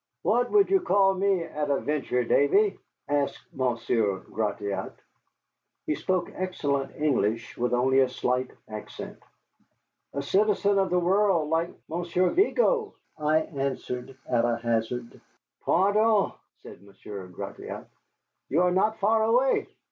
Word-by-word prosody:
"What 245 0 +2
would 405 -2 +4
you 390 - +5
call 195 - +3
me, 190 -2 +1
at 150 -2 -4
a 140 - +2
venture, 140 -4 -1
Davy?" 195 - +3 0.3
asked 145 -1 -2
Monsieur 115 -5 0
Gratiot. 100 -3 -3 0.9
He - - 0
spoke 180 +4 -1
excellent 145 -7 -2
English, 115 -7 0
with 120 0 -1
only 130 +2 +3
a 130 -1 +4
slight 125 0 -1 0.2
accent. 110 -1 -8 1.0
"A 140 - -2
citizen 200 +4 +2
of 190 -1 +1
the 180 - +2
world, 180 -3 +2
like 165 +1 +1 0.2
Monsieur 175 +2 0
Vigo," 445 +3 +2 0.2
I 155 +1 +3
answered 135 -3 -4
at 120 -2 +2
a 120 -1 +1
hazard. 115 +1 -2 0.4
"Pardieu!" 205 +2 +3 0.3
said - - -12
Monsieur 100 -1 -10
Gratiot, 90 - -8 0.6
"you 170 +5 +3
are 180 - +3
not 215 +4 +2
far 220 +2 +3
away. 245 +4 +2
150 Hz, 130 wpm, -27 LUFS, 125-195 Hz, 1.0 s, you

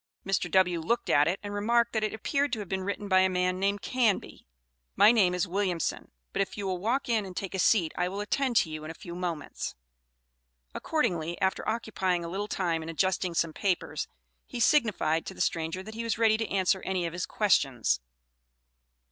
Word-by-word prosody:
Mr. 190 -2 0
W. 180 -1 +3
looked 230 +9 0
at 145 +1 +5
it 180 +4 0
and 205 0 -5
remarked 235 +3 +2
that 220 -1 0
it 215 - 0
appeared 280 +6 -1
to 235 - -1
have 205 -3 -5
been 190 +1 -2
written 200 +1 -3
by 190 -1 +5
a 190 0 +4
man 180 0 0
named 200 +1 0
Canby. 235 - 0 0.5
"My 215 - +7
name 190 -6 +3
is 180 +2 0
Williamson, 180 -2 -2 0.2
but - - +1
if 195 - -3
you 205 - -3
will 185 -2 -1
walk 240 +8 0
in 225 -3 +1
and 185 -2 -9
take 195 - -4
a 190 - -2
seat 180 -4 +3
I 180 - 0
will 195 +2 -5
attend 245 +5 0
to 160 - +3
you 155 0 -6
in 155 - -7
a 165 - -7
few 170 - -9
moments." 175 -3 -4 1.0
Accordingly, 175 - -1
after 190 +2 0
occupying 195 -6 -1
a - - -5
little 200 +4 -3
time 170 -5 -1
in 160 - -7
adjusting 180 +1 0
some 165 -1 +1
papers, 165 -6 -1 0.4
he 245 - -6
signified 215 - +2
to - - -6
the - - -14
stranger 165 +3 -1
that 220 +2 -9
he 230 +1 -4
was 230 0 -1
ready 225 -1 +4
to 225 - -3
answer 190 -1 +1
any 185 -2 -1
of 165 - -4
his 175 +1 -3
questions. 135 - +2
190 Hz, 210 wpm, -28 LUFS, 175-215 Hz, 1.0 s, My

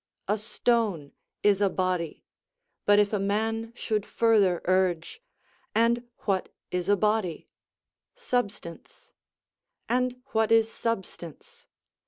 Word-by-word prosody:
A 210 +2 +1
stone 215 -8 0 0.3
is 205 -1 +4
a 200 - +4
body; 185 -3 -2 0.6
but 205 0 +6
if 205 0 +3
a 210 - +1
man 225 +3 -1
should 215 -3 -1
further 205 -6 +3
urge: 185 - +1 0.5
"And 235 +2 +2
what 195 -3 0 0.2
is 180 +1 -2
a 205 - +6
body?" 210 -5 0 0.7
"Substance"; 245 - -4 0.7
"And 250 +1 0
what 220 0 +2
is 225 0 +4
substance?" 190 -9 -5
210 Hz, 110 wpm, -27 LUFS, 185-225 Hz, 0.7 s, but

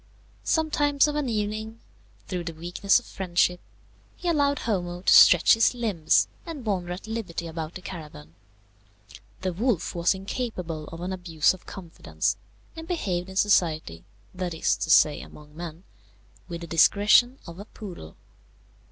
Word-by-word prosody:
Sometimes 295 -2 +2
of 295 - -2
an 295 -4 -1
evening, 215 +1 -3 0.5
through 180 -2 -4
the 165 -1 -5
weakness 175 +4 +1
of 245 - -5
friendship, 180 -1 0 0.6
he 355 - -6
allowed 285 -4 +2
Homo 180 -7 -2
to - - +4
stretch 175 -1 +8
his 225 +2 +3
limbs 210 -10 +2 0.2
and 310 -8 -8
wander 185 -4 -2
at 180 +4 -6
liberty 220 -7 -5
about 160 0 -6
the 185 - -8
caravan. 150 - -9 1.1
The 185 -1 -2
wolf 220 0 -1
was 170 +2 +1
incapable 190 -6 -5
of 165 +1 -9
an 185 +2 -3
abuse 170 -4 +1
of 185 - -15
confidence, 175 -4 -3 0.4
and 325 0 -8
behaved 190 - -2
in 190 - -10
society, 160 - +1 0.3
that 180 -2 -4
is 160 - +1
to - - -4
say 150 -2 +5
among 150 0 -14
men, 170 +1 -8 0.6
with 170 -1 -6
the - - -6
discretion 205 - +4
of 170 +1 -10
a 205 - -8
poodle. 180 - -10
185 Hz, 150 wpm, -26 LUFS, 170-220 Hz, 1.1 s, stretch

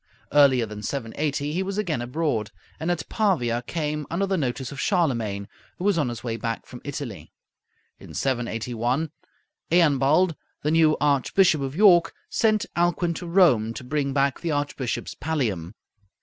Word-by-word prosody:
Earlier 135 -5 +5
than 105 -1 -8
780 140 +5 -2
he 180 - 0
was 195 +1 -3
again 175 - -1
abroad, 120 -4 -1 0.3
and 160 +2 -2
at 175 -2 -1
Pavia 125 - +1
came 150 +2 -3
under 185 +4 0
the 195 0 0
notice 130 -4 -2
of 140 - -7
Charlemagne, 115 - 0 0.3
who - - -6
was 200 -4 +2
on 140 -5 +1
his 120 - -6
way 115 -2 -2
back 115 +1 -3
from 125 - -11
Italy. 140 -7 -6 0.7
In - - -12
781 120 +3 -1 0.6
Eanbald, 155 +1 +4 0.3
the 150 - +1
new 160 -1 +4
Archbishop 150 +4 +3
of 135 +1 -3
York, 180 -3 +5 0.2
sent 215 -2 +2
Alcuin 175 0 +1
to 175 +1 -7
Rome 130 - +4
to - - -7
bring 140 +1 -1
back 140 0 +1
the 170 - -3
Archbishop's 145 -4 -2
pallium. 110 - -2
145 Hz, 155 wpm, -25 LUFS, 120-170 Hz, 0.7 s, Earlier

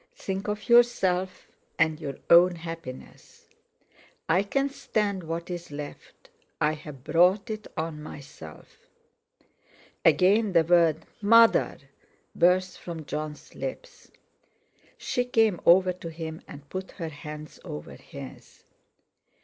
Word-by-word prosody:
Think 195 +1 -4
of 210 +1 -4
yourself 190 -7 +3 0.3
and 160 -2 +2
your 145 -4 -5
own 175 +1 +7
happiness! 165 -6 -10 0.8
I 170 +4 +3
can 275 +7 0
stand 205 -7 -1
what's 170 +1 -5
left—I've 150 0 -6
brought 180 - +3
it 215 -1 -6
on 160 -1 -3
myself." 135 - -12 1.2
Again 200 +2 +4
the 165 -2 +5
word 165 -2 +3 0.2
"Mother!" 230 +2 +5 0.6
burst 180 +1 +2
from 165 -3 -7
Jon's 150 +1 -6
lips. - - -7 0.9
She 245 - -1
came 225 -6 +2
over 185 +1 +6
to 175 -2 -8
him 160 0 -7
and 145 -1 -12
put 185 +4 -6
her 165 -4 -5
hands 150 0 -9
over 75 0 -8
his. - - -12
170 Hz, 110 wpm, -27 LUFS, 155-195 Hz, 1.2 s, own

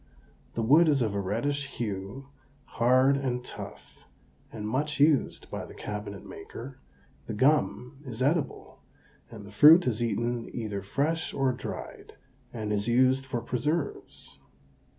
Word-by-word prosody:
The 115 - -1
wood 155 +8 +6
is 140 -4 +3
of 110 -3 -1
a 100 - -1
reddish 140 +8 -1
hue, 105 +5 -5 0.4
hard 130 +3 +3
and 125 -2 -2
tough, - - -10 0.5
and 105 -1 -5
much 145 +7 -1
used 145 -1 +2
by - - -4
the - - -11
cabinet 105 -1 -6
maker; 130 +3 -9 0.5
the 110 - -4
gum 135 +1 +1
is 125 -5 -7
edible, 145 +4 -1 0.5
and 110 -3 -10
the 100 - -12
fruit 155 - +8
is 120 -2 -1
eaten 120 0 -1
either 105 -4 -3
fresh 150 - -1
or 135 -1 +2
dried, 125 - -7 0.4
and 110 -2 -3
is 100 +1 -1
used 130 +2 +3
for 120 -2 -2
preserves. 145 +6 -3
125 Hz, 140 wpm, -28 LUFS, 110-140 Hz, 0.5 s, fruit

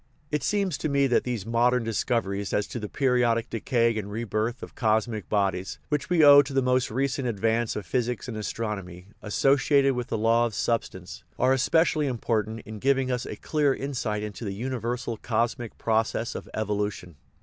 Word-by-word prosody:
It 150 -1 0
seems 200 -1 0
to 155 - -1
me 140 -1 +3
that 125 -3 +2
these 120 -6 -3
modern 120 +2 +2
discoveries 105 -3 -1
as 105 - +1
to 120 - -5
the 105 -2 -5
periodic 125 -4 +1
decay 115 0 +1
and 100 -1 -6
re 115 +3 -3
birth 115 +4 -2
of - - -9
cosmic 110 -1 0
bodies, 95 -2 0
which 150 -2 -1
we 175 -3 +4
owe 145 0 +10
to 140 0 -7
the 135 - +3
most 125 0 +2
recent 135 +2 -1
advance 115 +1 0
of 105 - -4
physics 120 +5 -2
and 120 - -5
as 105 -1 -3
tronomy, 100 -5 -5
associated 135 +4 +3
with 125 -1 -3
the - - -2
law 115 +2 +3
of 110 - -8
substance, 100 -4 -3
are 130 +1 +3
especially 155 +3 +2
important 115 -3 -1
in 110 0 -9
giving 135 +1 +1
us 125 -1 -2
a - - -5
clear 145 -3 +1
insight 115 -6 -3
into 105 +2 -6
the 100 -3 -4
universal 120 0 -3
cosmic 120 +1 -2
process 110 +1 0
of - - -7
evolution. 105 -5 -3
115 Hz, 185 wpm, -26 LUFS, 105-130 Hz, -, owe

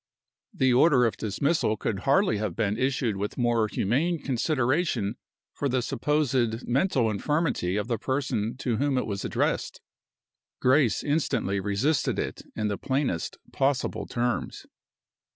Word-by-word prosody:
The 130 -1 +2
order 130 -1 +5
of 115 - 0
dismissal 110 - 0
could 100 -2 -2
hardly 185 - +4
have 105 -4 -3
been 105 -3 0
issued 125 -3 0
with 100 +1 -4
more 120 -3 +2
humane 140 - 0
consideration 130 - 0 0.4
for 140 - -2
the 130 -1 0
supposed 130 -4 0
mental 130 -1 +2
infirmity 125 - 0
of 105 +1 -2
the 115 -3 -1
person 125 -3 -1
to 120 -4 -1
whom 140 +1 +1
it 125 - 0
was 100 -2 -4
addressed. - - -1 0.8
Grace 130 -2 +3
instantly 140 -9 0
resisted 105 +10 0
it - - -3
in 105 - -1
the 100 -1 -2
plainest 130 - -1 0.2
possible 135 0 0
terms. 120 0 -2
125 Hz, 135 wpm, -27 LUFS, 110-140 Hz, 0.8 s, order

